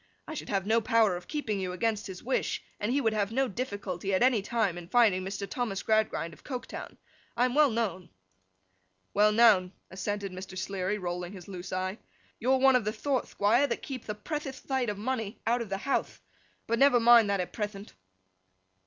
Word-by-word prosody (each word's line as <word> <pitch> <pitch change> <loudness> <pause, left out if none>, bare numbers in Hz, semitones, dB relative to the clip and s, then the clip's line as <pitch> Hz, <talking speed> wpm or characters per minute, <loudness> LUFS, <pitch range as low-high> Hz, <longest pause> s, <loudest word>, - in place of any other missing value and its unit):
I 315 - -5
should - - -6
have 195 -2 0
no 225 +2 +3
power 220 -4 +3
of 175 0 -8
keeping 225 -10 -2
you 185 -1 -3
against 215 +3 -1
his 185 -2 -8
wish, 260 - -1 0.2
and 210 +3 -1
he 275 - +2
would 225 -5 +1
have 205 -1 0
no 265 +3 +1
difficulty, 200 -5 -3
at 185 - +3
any 250 -4 +4
time, 210 -3 0
in 175 -1 -8
finding 210 -3 +4
Mr. 200 +1 -4
Thomas 225 -6 -3
Gradgrind 215 -7 +1
of - - -17
Coketown. 255 -3 -6 0.4
I 245 - +4
am 250 - -1
well 295 0 +5
known.' 205 -6 -2 1.0
'Well 210 +1 +5
known,' 210 -5 +5 0.2
assented 200 +1 -3
Mr. 185 0 -8
Sleary, 190 +1 -2
rolling 175 -1 -4
his 185 -3 -10
loose 185 -2 -7
eye. 185 +3 -2 0.4
'You're 260 +3 +3
one 265 0 +5
of 250 - +3
the 210 - -1
thort, 260 +4 -1
Thquire, 235 +8 +2
that - - -3
keepth 255 -5 -7
a 210 - -2
prethiouth 275 +4 -4
thight 265 -4 -1
of 205 - -3
money 225 -1 -3
out 240 +1 +2
of 225 - -5
the 195 - -1
houthe. 270 +7 -2 0.5
But 230 0 0
never 275 -3 +6
mind 230 -2 +7
that 200 -1 +1
at 180 - -3
prethent. 210 -1 -5
210 Hz, 200 wpm, -29 LUFS, 190-245 Hz, 1.0 s, mind